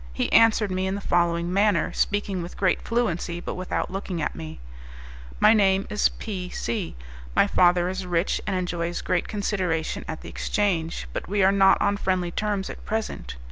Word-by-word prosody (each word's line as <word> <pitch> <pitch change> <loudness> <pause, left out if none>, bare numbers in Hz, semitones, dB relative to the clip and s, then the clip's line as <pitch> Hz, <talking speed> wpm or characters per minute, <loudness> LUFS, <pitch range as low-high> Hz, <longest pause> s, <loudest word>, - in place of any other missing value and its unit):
He - - -1
answered 220 -3 +5
me 185 +1 -1
in 190 - -1
the - - -3
following 175 -2 +1
manner, 200 -4 +2
speaking 205 -2 0
with 170 +1 -8
great 190 - +1
fluency, 175 -7 -1
but - - -5
without 185 0 -3
looking 190 -2 -4
at 150 - -1
me: 80 -3 -8 0.8
"My - - +7
name 195 -2 +3
is 210 - +3
P 185 -5 -6
C. 210 -2 -3 0.4
My - - +5
father 175 0 +3
is 190 +1 -3
rich, 175 +1 0
and 195 - 0
enjoys 175 -1 -2
great 180 - 0
consideration 190 -6 -1
at 160 - -5
the - - -9
exchange; 175 -6 -1
but - - -4
we 200 0 +2
are 190 - +6
not 195 -1 +5
on 205 0 +1
friendly 185 -3 0
terms 205 0 -1
at - - -9
present. 220 - -4
190 Hz, 180 wpm, -25 LUFS, 175-205 Hz, 0.8 s, My